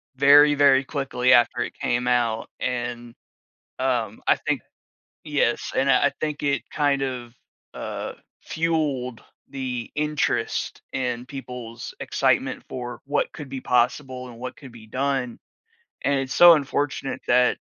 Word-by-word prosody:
very, 145 +2 +7
very 140 -2 +5
quickly 130 -3 +1
after 120 0 +4
it - - -3
came 120 +1 -1
out, 120 -2 +1
and, 120 -1 -3 0.7
um, 120 -5 -1
I - - +6
think - - -2 0.6
yes, 145 -6 0
and 135 +1 +3
I, 130 +2 +5
uh, - - -6
think 150 -1 -3
it 140 -1 +1
kind 145 -2 +1
of, 125 -3 -4 0.4
uh, - - -5 0.3
fueled 150 -7 -1 0.3
the 125 -4 -4
interest 150 0 -1
in 125 -2 -2
people's 125 -4 -8
excitement - - 0
for 120 -2 -6
what 145 0 0
could 145 -4 -8
be 135 -1 -5
possible 125 +1 0
and 115 -1 -12
what 125 +1 -6
could 135 -5 -12
be 115 -2 -13
done, 130 0 -2 0.7
and 140 0 +2
it's 135 0 -3
so 175 -1 +9
unfortunate 145 -2 -1
that 125 0 +4
130 Hz, 140 wpm, -24 LUFS, 120-140 Hz, 0.7 s, so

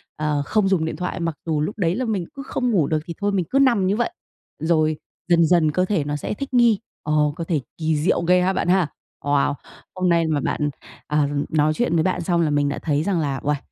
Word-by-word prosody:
ờ, 150 -1 0
không 215 +2 +1
dùng 175 -5 +2
điện 160 - -3
thoại, 180 +1 -4
mặc 165 -3 -2
dù 155 -3 0
lúc 205 +8 -3
đấy 175 -3 +1
là 255 +3 -1
mình 205 -6 -1
cứ 275 - -7
không 250 -2 -1
ngủ 165 -9 +2
được 155 -1 +1
thì 170 - -5
thôi 205 - +1
mình 190 -3 0
cứ 275 - +2
nằm 235 -9 +4
như 200 - +2
vậy, 240 +9 0 0.5
rồi 155 -2 +1 0.3
dần 170 -2 +4
dần 160 -2 +3
cơ 185 +4 +1
thể 190 -6 0
nó 145 0 -3
sẽ 150 - -3
thích 275 +5 -6
nghi, 235 -4 +4 0.2
ồ, 150 -1 +1
cơ 170 - -4
thể 165 -3 0 0.2
kỳ 160 -1 0
diệu 165 +3 +1
ghê 180 +1 +3
ha 185 +1 +2
bạn 185 - -1
ha. 180 -3 +3 0.4
Wow! 145 0 +2 0.4
Hôm 185 -1 +1
nay 170 -1 +3
mà 155 -2 +1
bạn, 150 +1 -1 0.4
ờ, 150 -1 +2 0.2
nói 155 0 +2
chuyện 240 -2 0
với 160 - +3
bạn 180 0 0
xong 170 0 +1
là 160 - +2
mình 145 -1 +1
đã - - -3
thấy 150 -1 0
rằng 185 -1 0
là 140 -4 -1
uầy, 150 0 +1
170 Hz, 255 wpm, -22 LUFS, 150-190 Hz, 0.5 s, nằm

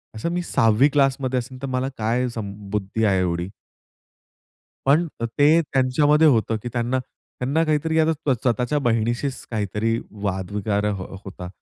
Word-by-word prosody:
असं 110 +10 -2
मी 175 - -1
6वी 115 +1 +3
क्लास 135 -2 +2
मध्ये 130 -1 0
असेल, 130 +2 -9
तर 135 - -3
मला 130 +1 -1
काय 120 +3 0
सम 105 -4 -5 0.2
बुद्धी 105 +2 -2
आहे 95 -2 +3
एवढी." 85 0 -1 1.4
पण 155 +5 +4
अ, 115 - -1
ते 145 +7 +4
त्यांच्यामध्ये 145 +3 +3
होतं 115 -5 +3
की 120 - -4
त्यांना 120 +1 0
त्यांना 130 +4 -3
काहीतरी 160 +1 +1
आहे 160 - +4
ना, 160 -3 0
स्वतःच्या 125 +4 0
बहिणीशीच 120 +4 0
काहीतरी 110 +1 -1 0.2
वाद 95 -2 -2
वगैरे 105 0 -1
अ, - - +2 0.3
होता. 90 -2 -8
125 Hz, 160 wpm, -23 LUFS, 110-140 Hz, 1.4 s, पण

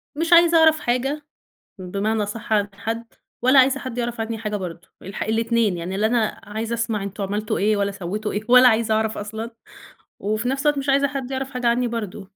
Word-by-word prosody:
مش 330 +2 +1
عايزة 340 0 +7
أعرف 315 -1 +5
حاجة، 270 +5 -1 0.5
بمعنى 200 +4 -1
أصح 215 +2 -4
عن 205 -1 +2
حد 230 +3 -4 0.4
ولا 260 +3 +6
عايزة 270 +1 +4
حد 255 -3 -6
يعرف 240 -1 -2
عنّي 225 0 -3
حاجة 215 -1 -3
برضه، 175 -3 -7
الح 195 +2 -5
الاتنين. 225 -3 +1
يعني 180 +3 -4
لا 215 +2 +2
أنا 225 -2 0
عايزة 220 +2 -4
أسمع 230 -1 -1
إن - - -5
أنتم 200 +1 -5
عملتوا 210 +2 -2
إيه 210 +1 +2
ولا 200 0 0
سوّيتوا 205 +2 -4
إيه 205 - -2
ولا 250 0 +8
عايزة 220 -1 +1
أعرف 220 0 0
أصلًا 220 +3 -5 0.7
وفي 215 +5 -1
نفس 270 0 -1
الوقت 295 -1 +3
مش 275 +1 -3
عايزة 280 +1 +3
حد 270 -2 -5
يعرف 265 0 -3
حاجة 250 -2 -2
عنّي 240 +1 +2
برضه. 215 -4 -5
225 Hz, 210 wpm, -22 LUFS, 210-255 Hz, 0.7 s, ولا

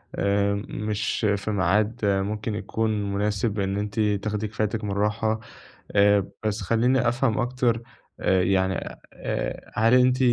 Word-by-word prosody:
آآ 100 0 +1 0.2
مش 105 +1 -2
في 110 - -4
ميعاد 105 +4 +1
ممكن 105 +2 0
يكون 105 -2 -1
مناسب 105 +1 0
إن 95 0 -1
أنتِ 105 +1 -3
تاخدي 105 0 0
كفايتِك 105 +1 -2
من 105 - -2
الراحة، 105 +2 0 0.5
آآ 100 -1 +4 0.2
بس 105 +1 -1
خلّيني 120 +5 +2
أفهم 120 -1 +1
أكتر 120 -1 0 0.4
آآ 95 -1 +3
يعني 95 0 +2 0.4
آآ - - -4
هل 115 +3 +4
أنتِ 125 0 +4
105 Hz, 135 wpm, -25 LUFS, 100-115 Hz, 0.5 s, آآ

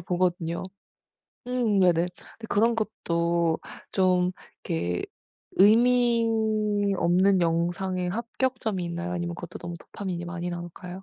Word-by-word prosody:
보거든요. 175 -1 -1 0.9
음 240 -5 +1
네네. 175 -2 +4
근데 225 - -13
그런 230 +3 +3
것도 170 -6 0 0.3
좀 180 -1 +3 0.3
이렇게 85 +2 -1 0.5
의미 235 +3 +5 0.7
없는 185 +3 +3
영상의 175 +2 0
합격점이 230 -3 -2
있나요 170 +1 -4
아니면 175 -1 -3
그것도 175 +1 -8
너무 175 - -6
도파민이 180 -3 -5
많이 175 0 -4
나올까요? 175 +2 -7
180 Hz, 265 characters per minute, -26 LUFS, 170-210 Hz, 0.9 s, 의미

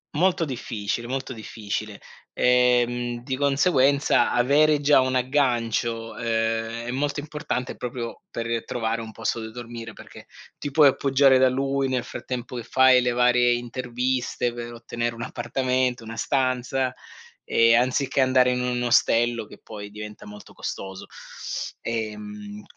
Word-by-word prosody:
Molto 175 +1 +2
difficile, 120 -3 -4
molto 130 +1 -3
difficile 110 -2 -5 0.3
ehm, 120 -1 +2
di 130 +1 -2
conseguenza 140 0 +3
avere 145 +5 +4
già 145 -1 +5
un 130 0 0
aggancio, 120 -4 0
ehm, 115 0 -1
è 120 - -3
molto 145 +3 -1
importante 150 -4 -4
proprio 120 -1 -6
per 115 0 -3
trovare 115 -1 -2
un 110 -1 -8
posto 115 +1 -2
dove 110 0 -7
dormire 115 -1 -8
perché - - -13 0.3
ti 145 - -4
puoi 145 0 +6
appoggiare 135 0 +4
da 130 0 +5
lui 135 +1 0
nel 130 -2 0
frattempo 125 0 -6
che - - -3
fai 130 +1 +5
le 125 - +1
varie 125 0 +4
interviste, 125 0 -2
per 120 0 -6
ottenere 120 0 -4
un 115 - -6
appartamento, 125 0 -1
una 115 0 -7
stanza 130 0 0 0.5
e 115 0 +4
anziché 130 +3 +2
andare 130 -1 +4
in 125 0 -1
un 125 0 -1
ostello 120 -1 +2
che - - -13
poi 105 -2 -8
diventa 105 0 -9
molto 105 0 -12
costoso. 95 -1 -6 0.7
Ehm, 105 -2 -5
120 Hz, 140 wpm, -24 LUFS, 115-130 Hz, 0.7 s, puoi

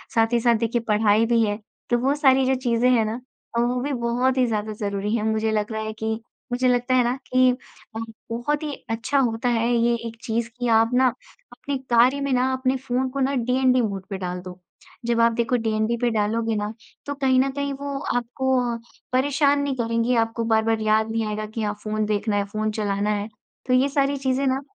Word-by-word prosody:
साथ 225 +1 +3
ही 235 - +4
साथ 235 0 +3
देखिए 230 +1 0
पढ़ाई 215 +1 +3
भी 230 0 +3
है, 205 +1 -2 0.3
तो 240 - +3
वो 270 +3 +1
सारी 265 -2 +4
जो 265 - +2
चीज़ें 250 -1 +1
हैं 230 -3 +3
ना 225 +3 -4 0.4
अ, - - +3
वो 245 +1 0
भी 285 - -2
बहुत 245 +2 0
ही 255 - +4
ज़्यादा 215 -1 -2
ज़रूरी 205 +1 -2
हैं। 215 - -1
मुझे 220 0 0
लग 215 0 -1
रहा 220 0 -3
है 220 - -3
कि 220 0 0 0.4
मुझे 255 +1 +1
लगता 245 +1 +2
है 250 - +4
ना 245 +2 0 0.2
कि 255 0 +5 0.4
अ, - - -3 0.3
बहुत 290 +6 -1
ही 295 -2 -3 0.2
अच्छा 225 +5 -1
होता 240 -1 0
है 230 0 +1
ये 235 0 +3
एक 230 - -8
चीज़ 230 0 -1
कि 245 - -1
आप 225 +1 +3
ना 260 +1 +5 0.4
अपने 280 -1 -4
कार्य 245 +4 +4
में 280 -1 -1
ना 255 +1 +2
अपने 260 0 0
फ़ोन 255 0 -1
को 275 - -5
ना 270 +1 +1
डीएनडी 255 +1 +2
मोड 195 -4 -3
पे 195 - -3
डाल 180 -1 -4
दो, 180 0 -10 0.5
जब 235 0 +1
आप 230 0 +5
देखो 235 +1 0
डीएनडी 220 0 0
पे 240 - +3
डालोगे 225 +1 0
ना, 210 +1 -2 0.3
तो 285 - -3
कहीं 265 -2 +2
न 270 +1 +2
कहीं 280 0 -3
वो 280 0 -4 0.2
आपको 260 +2 0 0.2
अ, - - -5 0.4
परेशान 285 +2 +3
नहीं 285 -1 -1
करेंगी, 230 0 0
आपको 230 0 0
बार-बार 220 0 +2
याद 215 +1 +2
नहीं 225 0 -1
आएगा 215 0 -3
कि 220 +1 -6
हाँ, 210 0 -1
फ़ोन 215 0 -1
देखना 210 0 0
है, 200 - +2
फ़ोन 215 +1 -2
चलाना 205 -1 -1
है। 205 0 -1 0.4
तो 255 - +2
ये 260 +2 +4
सारी 280 0 +1
चीज़ें 265 0 0
ना 265 +1 +1
235 Hz, 225 wpm, -23 LUFS, 220-260 Hz, 0.5 s, कि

